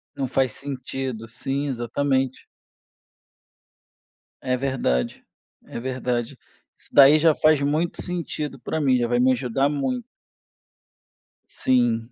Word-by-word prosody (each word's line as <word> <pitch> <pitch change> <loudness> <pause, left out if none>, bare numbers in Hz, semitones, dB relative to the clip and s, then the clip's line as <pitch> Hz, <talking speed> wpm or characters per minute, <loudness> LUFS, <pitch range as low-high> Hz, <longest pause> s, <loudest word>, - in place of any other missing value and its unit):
Não, 135 -2 -2
faz 130 0 +1
sentido, 130 -4 -5
sim, 135 +5 -3
exatamente. 130 +1 -1 2.0
É 125 0 0
verdade, 125 - -1 0.4
é - - -6
verdade. 125 -2 -2 0.4
Isso - - -18
daí 145 +2 +7
já 160 -1 +4
faz 155 -2 +3
muito 155 +4 -1
sentido 155 -5 -4
para 160 +5 -3
mim, 130 -3 +3
já 120 - 0
vai 120 +1 +1
me 130 +1 +4
ajudar 130 +3 0
muito. 135 -4 -2 1.5
Sim. 120 -2 +1
130 Hz, 115 wpm, -23 LUFS, 120-140 Hz, 2.0 s, daí